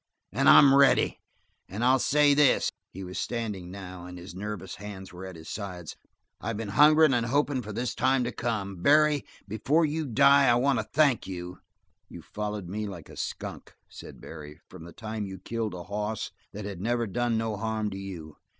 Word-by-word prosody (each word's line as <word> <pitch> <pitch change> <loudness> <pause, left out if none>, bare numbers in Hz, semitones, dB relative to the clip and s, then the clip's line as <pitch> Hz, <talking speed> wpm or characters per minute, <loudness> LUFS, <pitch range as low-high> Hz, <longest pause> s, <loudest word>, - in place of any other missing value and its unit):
"And - - +3
I'm 140 -1 +8
ready. 140 0 +4 0.5
And 105 +6 -4
I'll 130 +2 +4
say 145 +2 +4
this" 145 -2 +3 0.2
he 95 - -9
was 90 0 -6
standing, 105 -7 -4
now, 90 -2 -9
and 90 0 -9
his 90 +2 -10
nervous 95 -1 -6
hands 95 -2 -9
were 90 +2 -8
at 95 - -9
his 80 0 -12
sides 90 -5 -6 0.4
"I 115 - -3
been 110 -1 -5
hungerin' 155 +5 +6
and 120 -1 +1
hopin' 140 0 +1
for 105 -2 -8
this 120 +4 -3
time 130 -1 +2
to 120 - -2
come. 100 -6 -3
Barry, 150 +3 +4 0.2
before 135 +11 +1
you 155 0 -2
die, 140 +3 +5
I 120 - +5
want 130 0 +2
to 110 - -3
thank 145 -6 +3
you!" 90 -1 -7 0.5
"You've 85 - -11
followed 105 -3 -5
me 105 +4 -4
like 85 -6 -9
a - - -12
skunk," - - -6
said - - -11
Barry, 75 +1 -10
"from 90 -3 -12
the 85 - -10
time 110 -1 -5
you 95 0 -7
killed 110 +1 -4
a 90 - -7
hoss 105 +3 -4 0.2
that 105 0 -7
had 100 -3 -6
never 120 +2 0
done 115 +3 -1
no 110 -1 -2
harm 110 0 -2
to 95 - -6
you. 85 -6 -8
105 Hz, 195 wpm, -27 LUFS, 95-125 Hz, 0.5 s, I'm